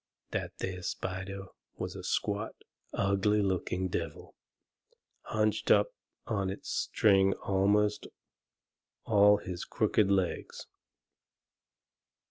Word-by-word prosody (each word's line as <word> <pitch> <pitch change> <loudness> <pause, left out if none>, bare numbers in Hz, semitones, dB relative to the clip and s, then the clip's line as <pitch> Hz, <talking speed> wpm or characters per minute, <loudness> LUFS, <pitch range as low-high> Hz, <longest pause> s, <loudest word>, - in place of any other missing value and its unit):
That - - -3
there 90 -1 -4
spider 95 +2 -4 0.3
was 95 +1 -4
a 95 - -7
squat, 105 +3 -1 0.4
ugly 100 +2 +2
looking 95 -1 -1
devil, 85 -4 -5 0.9
hunched 110 0 0
up 105 0 +4 0.3
on 100 -3 -1
his 95 - -7
string 95 -2 +3
amongst 100 +2 +2 1.0
all 105 -1 +6
his 90 -2 -6
crooked 105 -2 +1
legs. 95 -3 -1
100 Hz, 95 wpm, -31 LUFS, 95-105 Hz, 1.0 s, all